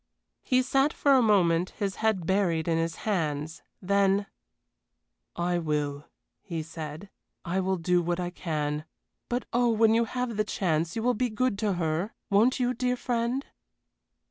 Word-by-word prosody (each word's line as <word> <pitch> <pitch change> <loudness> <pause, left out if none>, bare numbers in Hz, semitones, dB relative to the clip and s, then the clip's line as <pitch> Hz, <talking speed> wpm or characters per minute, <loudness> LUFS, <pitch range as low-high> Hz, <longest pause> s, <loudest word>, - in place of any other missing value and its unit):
He 255 0 +2
sat 270 +3 +2
for 280 - +3
a 260 - +6
moment, 185 -5 +3
his 195 -2 -2
head 215 -6 +1
buried 175 -4 +1
in 165 -1 +2
his 165 0 -1
hands 160 -6 -1 0.2
then 200 +1 +2 1.1
"I 175 0 0
will," 150 -2 -2 0.4
he 165 -4 -4
said, 160 +3 -8 0.3
"I 180 +2 0
will 190 0 0
do 175 +1 +2
what 175 +1 -1
I 175 0 -2
can; 150 -3 -3 0.4
but 245 +1 -1
oh, 240 0 +3
when 225 0 +4
you 230 +1 +3
have 250 -1 -3
the 215 - +3
chance 165 -5 -1
you 225 - -2
will 250 +1 +3
be 245 +2 0
good 230 +1 0
to 210 -2 +1
her, 170 +3 -2 0.2
won't 230 +7 +4
you, 250 0 +1
dear 250 +1 0
friend?" 245 +2 -1
190 Hz, 165 wpm, -28 LUFS, 165-230 Hz, 1.1 s, a